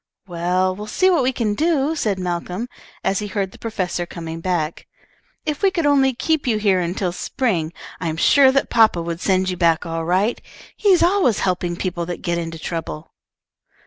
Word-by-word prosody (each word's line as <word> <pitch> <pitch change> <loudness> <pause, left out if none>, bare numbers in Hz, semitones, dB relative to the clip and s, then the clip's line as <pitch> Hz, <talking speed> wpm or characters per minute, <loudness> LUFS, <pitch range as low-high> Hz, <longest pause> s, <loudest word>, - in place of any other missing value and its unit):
"Well, 180 +1 0
we'll 210 +2 -7
see 370 - +3
what 340 -6 +3
we 255 +1 +2
can 230 -5 -1
do," 310 +2 +1
said 210 -10 0
Malcolm, 180 +4 -3 0.4
as 195 - +1
he 210 - -4
heard 195 -1 -2
the - - -15
professor 185 -6 -3
coming 165 -1 -7
back. 170 -3 -2 0.6
"If 300 -2 -2
we 395 - +5
could 340 -4 -1
only 275 -2 +4
keep 315 +2 0
you 225 -3 +2
here 200 -3 +2
until 180 +1 -1
spring, 175 -4 -1 0.3
I 170 - -3
am 160 0 -2
sure 270 - +6
that 275 +1 0
papa 225 -6 +4
would 170 +1 -4
send 185 -1 +1
you 180 - -4
back 170 -1 +2
all 165 -1 -3
right. 185 +7 +1 0.3
He's 390 -5 +4
always 350 - +3
helping 180 -2 0
people 175 -1 -3
that 175 - -5
get 170 0 0
into 165 -1 -5
trouble." 160 -1 -5
185 Hz, 190 wpm, -21 LUFS, 170-250 Hz, 0.6 s, sure